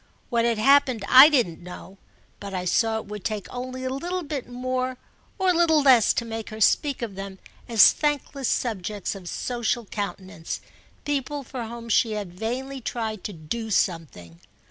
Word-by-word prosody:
What 235 -1 +2
had 235 -2 +1
happened 260 -2 +4
I 265 +4 +10
didn't 235 - +1
know, 180 +2 -11 0.4
but 200 -1 -7
I 180 -1 -3
saw 225 +4 +2
it 220 - -6
would 210 -1 -8
take 215 -4 -3
only 255 +1 -5
a 260 - -2
little 350 +7 -3 0.3
more 255 +1 -2 0.4
or 380 -2 +1
a - - +5
little 320 -3 +4
less 255 -5 +6
to 235 - -2
make 225 -1 -6
her 215 0 -8
speak 275 +4 +2
of 220 -4 -4
them 195 0 -7 0.3
as 225 -3 +8
thankless 285 -3 -2
subjects 210 -4 -2
of 185 -3 -9
social 240 -1 -2
countenance—people 215 - -5
for 250 -1 -6
whom 235 0 -8
she 225 0 +2
had 205 -4 -5
vainly 255 +7 -4
tried 220 -4 -4
to 210 - -4
do 220 +8 -5
something. 150 - -2
230 Hz, 165 wpm, -25 LUFS, 200-260 Hz, 0.4 s, I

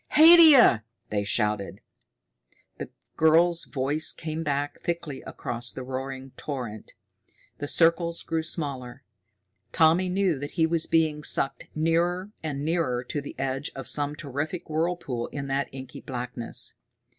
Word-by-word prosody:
"Haidia!" 310 - +8 0.3
they 105 -1 -1
shouted. 105 -1 -1 1.0
The - - -6 0.3
girl's 165 +2 +4
voice 145 +3 0
came 160 0 -5
back 145 -2 -2
thickly 170 -5 -4
across 120 0 -5
the 130 - -7
roaring 130 +1 -6
torrent. 120 -7 -6 0.7
The 145 - -4
circles 170 +1 +2
grew 165 0 -1
smaller. 140 -5 -4 0.7
Tommy 165 +5 +3
knew 185 -5 +1
that 145 +1 -6
he 160 - +4
was 165 0 +2
being 155 -2 +1
sucked 135 - +1
nearer 170 +5 0
and 145 -2 -4
nearer 155 -7 0
to 145 +3 -4
the 140 - -9
edge 135 +1 -2
of 135 - -6
some 145 0 +2
terrific 150 +3 -5
whirlpool 155 -7 -2
in 145 -1 -6
that 135 +1 -1
inky 130 -1 -9
blackness. 125 -2 -2
145 Hz, 135 wpm, -26 LUFS, 130-165 Hz, 1.0 s, Haidia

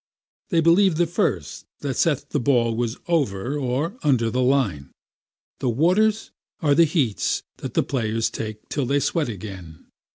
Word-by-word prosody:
They 170 -4 +3
believe 175 +2 +4
the 175 +2 +2
first 165 - -2
that - - -2
saith - - 0
the - - 0
ball 120 -3 +2
was 120 +1 -2
over 135 - 0
or 145 - -2
under 125 -7 +2
the 125 +2 0
line. 120 - +1 0.7
The 130 - 0
waters 190 - +2 0.3
are 145 -3 +3
the 165 +3 +6
heats 145 - 0
that - - -7
the - - +3
players 115 -3 -1
take 110 -1 -6
till 140 -4 -2
they 140 +2 +2
sweat 150 -1 0
again. 95 -6 -9
130 Hz, 160 wpm, -23 LUFS, 110-165 Hz, 0.7 s, the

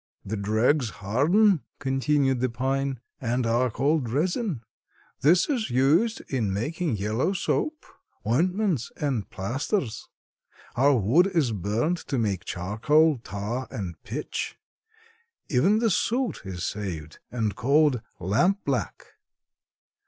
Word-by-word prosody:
"The 105 - -3
dregs 110 +6 +2
harden," 155 - +3 0.2
continued 135 0 +1
the 130 +1 +1
pine, 135 +2 -1 0.2
"and 125 0 -1
are 120 +2 +2
called 140 +1 0
resin. 170 - -1 0.6
This 170 +6 +5
is 250 -7 -1
used 155 - +3
in 115 -7 -1
making 145 - -1
yellow 110 - 0
soap, 305 - -1 0.4
ointments 180 - +1
and 135 -8 -2
plasters. 125 - -2 0.7
Our 140 +1 +4
wood 125 - +4
is 165 -11 +1
burned 110 - 0
to 135 - -1
make 100 -6 -1
charcoal, 130 - +2
tar 115 +4 -4
and 95 -5 -5
pitch. 135 +9 -4 0.9
Even 175 +11 +3
the 225 -1 +2
soot 245 +6 0
is 90 -2 -5
saved, 85 -7 -5
and 110 -5 -2
called 140 +1 +3 0.2
lampblack. 130 - 0
130 Hz, 115 wpm, -26 LUFS, 110-160 Hz, 0.9 s, This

